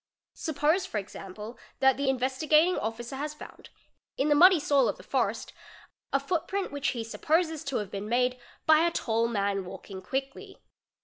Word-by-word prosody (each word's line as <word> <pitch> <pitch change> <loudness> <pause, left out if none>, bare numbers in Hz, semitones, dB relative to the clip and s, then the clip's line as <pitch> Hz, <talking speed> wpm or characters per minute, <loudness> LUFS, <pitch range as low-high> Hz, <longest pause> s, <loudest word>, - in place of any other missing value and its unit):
Suppose 315 +3 0
for - - -4
example, 210 +3 -8 0.2
that 265 -1 +5
the 280 0 0
Investigating 300 +7 +3
Officer 235 +4 -4
has 300 +2 -4
_ - - -25
found, - - -12 0.5
in 285 - +1
the - - +6
muddy 355 +3 +7
soil 285 -1 +3
of - - -3
the - - -13
forest, - - -1 0.6
a 275 - +3
footprint 365 +6 -2
which 285 -1 -2
he 235 -3 -1
supposes 315 +7 0
to 275 -2 -3
have 205 -3 -4
been 200 +1 -5
made 250 +1 +1 0.3
by 315 -1 +6
a 340 +1 +3
tall 230 -7 0
man 200 -3 -1
walking 190 +1 -9
quickly. 270 +8 -5
270 Hz, 175 wpm, -28 LUFS, 225-305 Hz, 0.6 s, muddy